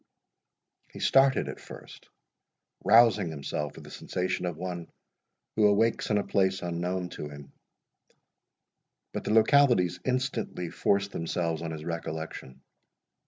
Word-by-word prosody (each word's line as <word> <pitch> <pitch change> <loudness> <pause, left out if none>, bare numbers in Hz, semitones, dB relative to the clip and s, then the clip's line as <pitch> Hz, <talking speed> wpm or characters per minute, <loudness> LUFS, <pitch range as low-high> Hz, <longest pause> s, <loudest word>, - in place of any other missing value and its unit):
He - - -10
started 135 0 +4
at - - -6
first, - - -12 0.7
rousing 105 -4 +5
himself 75 -1 -4
with - - -11
the - - -12
sensation 90 0 -2
of 85 -3 -4
one 90 -1 -6 0.6
who 105 -1 +5
awakes 110 +3 +2
in 105 - +3
a 100 - +1
place 95 -1 +1
unknown 90 +1 -2
to 75 - -7
him; 70 -1 -12 1.6
but - - -4
the - - -1
localities 110 - +4
instantly 125 -9 -2
forced 100 0 +1
themselves 85 -1 -2
on 85 - -4
his 80 -1 -6
recollection. 80 -5 -6
90 Hz, 125 wpm, -28 LUFS, 85-105 Hz, 1.6 s, rousing